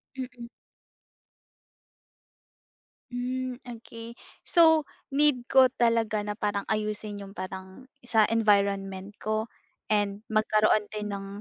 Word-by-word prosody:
Mm. 255 -2 -7 2.6
Hmm 255 +1 -3
okay. 230 -1 -10 0.3
So, 320 -3 +5 0.3
need 275 -4 +3
ko 260 -1 +6
talaga 230 -2 +2
na 210 - -2
parang 205 -2 -2
ayusin 215 -1 -2
yung 195 - -10
parang, 190 +5 -8 0.2
sa 220 -3 +3
environment 200 -3 +1
ko. 215 +1 -2 0.4
And 205 0 0
magkaroon 215 -1 +2
din 210 -1 -4
ng 195 0 -7
215 Hz, 100 wpm, -27 LUFS, 205-245 Hz, 2.6 s, ko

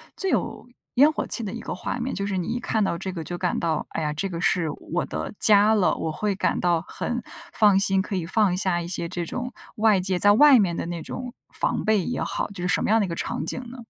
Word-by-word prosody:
最 385 - -2
有 225 0 -2 0.3
烟 285 +5 +6
火 310 - -3
气 235 - 0
的 195 - -4
一 - - -5
个 - - -5
画 180 - -4
面， 255 +2 -3
就 200 - -2
是 195 -2 -2
你 180 - -2
一 240 +1 -2
看 220 -3 0
到 170 - -1
这 190 +2 -4
个 170 -3 -5
就 175 +3 -5
感 180 -1 -1
到， 160 -2 -1
哎 - - -4
呀， 150 -1 -1
这 175 +6 -3
个 170 -2 -5
是 175 -3 +2 0.2
我 175 - 0
的 - - -5
家 210 0 +6
了， 205 -4 +2
我 160 - -3
会 205 +5 -2
感 - - 0
到 170 -2 +2
很 245 -1 -4 0.3
放 205 -3 +4
心， 195 -1 +2
可 195 0 -4
以 175 - -2
放 195 0 +2
下 185 -2 0
一 170 - -6
些 170 -1 -3
这 175 -1 -4
种 250 +8 -5 0.2
外 215 -2 +4
界 185 0 -1
在 205 +2 +7
外 280 +1 +7
面 180 -4 +1
的 - - -3
那 170 -1 -5
种 250 +8 -6 0.2
防 - - -1
备 215 -3 +2
也 245 - -3
好， - - -2
就 190 -3 -7
是 - - 0
什 180 - +1
么 - - -1
样 225 +1 +4
的 210 - +1
一 185 - -6
个 170 - -3
场 155 - -3
景 210 - -3
呢？ 255 +1 -10
195 Hz, 295 characters per minute, -24 LUFS, 175-220 Hz, 0.3 s, 在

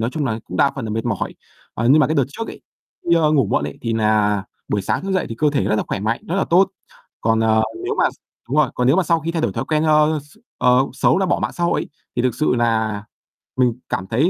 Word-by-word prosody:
nói 115 +2 0
chung 155 -2 -2
là 110 -2 -1
cũng - - -7
đa 140 -2 +4
phần 135 -6 -5
là 110 - -4
mệt 110 +2 -2
mỏi. 115 -5 -2 0.4
Ờ, 120 +2 0
nhưng 155 - +6
mà - - +4
cái 155 - -1
đợt 140 - +3
trước 225 +10 -6
ấy, - - -9 0.5
đi, 170 - +5
ơ, 155 -2 +3
ngủ 135 -8 +3
muộn 70 - 0
ấy, 75 - -6
thì 115 -1 -1
nà 105 -2 +2 0.3
buổi 100 -2 0
sáng - - -1
thức 195 0 -3
dậy 185 - 0
thì 115 - -5
cơ 150 -1 +3
thể 145 - 0
rất - - +1
là - - +1
khỏe - - -2
mạnh, 110 +3 -1
rất 175 - -1
là 195 - +2
tốt. 185 +3 +3 0.5
Còn, 115 0 +2
ờ, 110 0 +3 0.2
nếu - - -1
mà - - +3
x - - -18 0.3
đúng 140 - -1
rồi, 150 -5 +3
còn 125 - 0
nếu 135 +7 +4
mà 190 - +4
sau 165 -1 +1
khi 165 - -3
thay 165 -2 -1
đổi - - 0
thói - - -3
quen, 155 -1 0
ơ, 155 0 +3
x 150 +8 -21 0.2
ờ, 125 +2 +4
xấu, 180 - +2
là 190 - +1
bỏ 175 - +1
mạng - - -1
xã 175 - -2
hội 170 - +1
ấy, - - -6 0.3
thì 120 - +1
thực 125 -2 +1
sự 155 -4 +1
nà 110 -3 0 0.5
mình 125 -2 +3 0.2
cảm 95 -1 -3
thấy 135 +10 +2
130 Hz, 295 wpm, -20 LUFS, 110-155 Hz, 0.5 s, nhưng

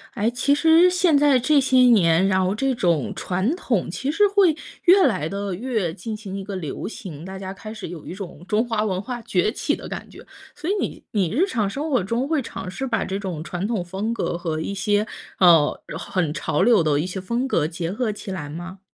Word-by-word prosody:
哎， 215 +3 +1
其 255 +4 +1
实 325 +4 +5
现 360 -4 +3
在 280 -2 +4
这 290 +4 +4
些 260 -1 +2
年， 195 -8 +5
然 190 -1 +2
后 185 - +1
这 265 +4 0
种 170 - +1
传 190 - -1
统 235 - -1
其 265 +10 -2
实 410 +6 +4
会 395 -4 +4 0.3
越 370 -1 +6
来 185 - -1
地 200 0 -3
越 215 -6 -2
进 215 +6 -6
行 200 -3 -7
一 195 - -5
个 200 +1 -7
流 155 -6 -5
行， 170 -9 -7
大 190 +1 -7
家 190 0 -6
开 215 +3 -9
始 220 - -7
有 165 -2 -9
一 - - -6
种 185 -4 -8
中 215 +5 +1
华 225 -2 0
文 190 -3 -1
化 240 +2 -5
崛 185 -3 +1
起 - - -1
的 - - -6
感 - - -7
觉。 - - -13 0.3
所 330 - -5
以 - - +3
你 - - -4
你 195 -6 +1
日 325 - +2
常 220 - 0
生 290 +9 -4
活 255 -9 +2
中 230 +7 -1
会 310 -2 +1
尝 190 -6 -7
试 265 +8 -4
把 225 -5 -1
这 190 - -3
种 185 -6 -5
传 175 +3 -4
统 210 -5 -1
风 195 +6 -3
格 200 - -2
和 165 -3 -3
一 160 - -3
些， 205 +2 +1 0.3
呃， 165 -5 +5
然 - - -6
后 - - -9
很 165 -5 0
潮 150 - -1
流 220 -4 +5
的 150 -2 +2
一 160 - -1
些 185 +1 -5
风 235 +7 -1
格 150 - +1
结 165 +1 -3
合 215 +3 -1
起 205 -1 -7
来 150 -6 -5
吗？ 175 +5 -8
205 Hz, 255 characters per minute, -23 LUFS, 180-255 Hz, 0.3 s, 越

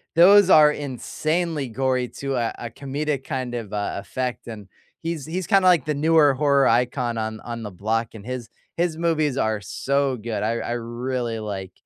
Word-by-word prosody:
those 190 +3 +7
are 150 -3 +7
insanely 150 +2 -2
gory 130 +1 0
to 135 +2 -5
a 115 -2 0
a 120 - -6
comedic 140 +1 -3
kind 130 -4 -3
of, 115 -4 -5
uh, 105 -1 -2
effect, 125 -2 -4
and 105 -4 -8 0.3
he's 165 -3 -3
he's 175 +2 -3
kinda 195 -2 +4
like 170 -6 +4
the 150 - 0
newer 150 -1 +4
horror 140 0 +3
icon 120 -1 +1
on 110 0 -3
on 115 -1 -6
the 105 - -5
block, 110 +4 -2
and 105 0 -10
his 125 -2 -5 0.3
his 170 -2 0
movies 155 -5 0
are 110 -3 0
so 140 +4 -1
good; 110 -1 -4
I 110 +2 0
I 120 - -4
really 120 0 -3
like, 100 -3 -5
130 Hz, 180 wpm, -23 LUFS, 115-150 Hz, 0.3 s, those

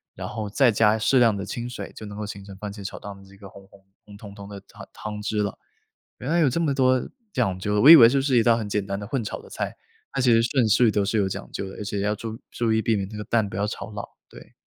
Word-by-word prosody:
然 - - -6
后 105 -2 -5
再 125 +2 +3
加 110 0 +3
适 130 +4 +3
量 115 -3 +4
的 100 - -4
清 120 +5 -5
水， 125 - -7
就 110 - -9
能 105 0 -9
够 105 - -4
形 100 -1 -8
成 100 -1 -10
番 105 +1 -6
茄 100 -1 -9
炒 - - -6
蛋 100 -1 -8
的 100 - -16
这 95 0 -18
个 100 - -12
红 100 0 -15
红 100 0 -21 0.2
红 105 -1 -13
彤 100 -1 -11
彤 100 0 -10
的 100 -1 -8
汤 - - -14
汤 105 -1 -6
汁 105 0 -2
了。 105 - -4 0.6
原 130 - -5
来 170 - +3
有 150 -5 +4
这 165 - -1
么 155 -4 +1
多 130 -1 +3 0.3
讲 95 - 0
究， 105 +2 0
我 140 - +6
以 - - +13
为 115 -6 +9
就 140 - +1
是 135 -3 +2
一 115 - +3
道 115 -1 +4
很 110 -3 -4
简 105 0 -1
单 100 0 -4
的 100 - -6
混 130 0 -2
炒 105 - -5
的 - - -16
菜， - - -4 0.4
它 135 - -3
其 125 -2 +4
实 115 - +5
顺 125 -1 +1
序 115 +2 +4
都 105 -1 0
是 105 +3 -2
有 100 -2 +1
讲 - - -6
究 95 - -5
的， - - -10
而 - - -5
且 100 0 -3
要 105 +1 0
注 110 +1 -7
注 115 -2 0
意 110 - +2
避 115 - +1
免 100 -2 -2
这 105 - -10
个 105 - -5
蛋 110 -3 +1
不 - - -8
要 100 +1 -1
炒 110 - -6
老， 105 -1 -6 0.3
对。 - - -15
105 Hz, 330 characters per minute, -24 LUFS, 100-120 Hz, 0.6 s, 以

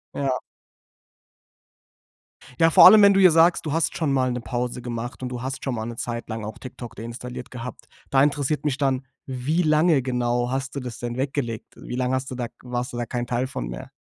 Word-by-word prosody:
Ja. 135 -2 0 2.2
Ja, 165 - +6
vor - - +8
allem, 215 -1 +10
wenn 200 0 +7
du 195 - +3
ja 185 -2 +7
sagst, 165 +2 +4
du 150 - -2
hast 165 0 0
schon 150 -4 0
mal 130 -1 +2
'ne 125 - -2
Pause 125 +1 -3
gemacht. 120 +1 -5
Und 130 - -3
du 125 -1 -5
hast 130 +1 -5
schon 130 -3 -2
mal 110 -1 -3
'ne 120 0 -6
Zeit 120 0 -4
lang 110 -1 -4
auch 110 - -7
TikTok 125 -2 -9
deinstalliert 125 +2 -7
gehabt. 125 -1 -8 0.3
Da 135 0 +5
interessiert 145 0 0
mich 145 -3 0
dann: 135 -2 0 0.2
Wie 135 +6 -1
lange 155 -1 +4
genau 125 -1 0
hast 135 0 -3
du - - -1
das 125 -3 -7
denn 120 0 -4
weggelegt? 130 -4 -3
Wie - - -7
lange 125 0 0
hast 130 0 -3
du - - -4
da 120 -1 -3
k - - -29
warst 125 +1 -4
du - - -4
da 120 - -2
kein 120 +1 -3
Teil 125 +2 -1
von - - -5
mehr? - - -7
125 Hz, 220 wpm, -24 LUFS, 120-140 Hz, 2.2 s, allem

